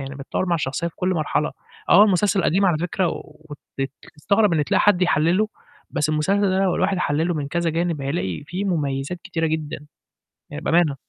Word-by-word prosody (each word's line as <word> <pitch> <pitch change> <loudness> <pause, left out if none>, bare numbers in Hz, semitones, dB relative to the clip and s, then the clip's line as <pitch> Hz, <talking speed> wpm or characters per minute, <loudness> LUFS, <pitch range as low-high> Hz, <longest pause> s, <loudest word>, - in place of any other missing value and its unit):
يعني 135 +1 -6
بتتطوّر 140 +6 -3
مع 175 - +1
الشخصية 155 +1 -2
في - - -17
كل 180 - -1
مرحلة، 155 -4 0 0.4
آه 205 - +8
المسلسل 195 -1 +2
قديم 195 +4 +2
على 165 -4 +2
فكرة 175 +1 0
وتت 145 -4 -7 0.2
وتستغرب 200 +5 +1
إن 150 -3 +2
تلاقي 200 +3 +2
حد 195 -3 +3
يحلّله، 180 +5 +2 0.4
بس 150 - -1
المسلسل 155 +6 +1
ده 190 - +1
لو 190 -2 +2
الواحد 190 0 0
حلّله 165 +2 0
من 145 -2 -3
كذا 170 +1 0
جانب 165 -1 -1
هيلاقي 135 - -3
فيه 180 +5 -4
مميزات 145 -3 -2
كتيرة 170 -3 -1
جدًا، 155 -2 -4 0.6
يعني 150 +2 -7
بأمانة. 165 -5 +2
170 Hz, 185 wpm, -22 LUFS, 150-185 Hz, 0.6 s, آه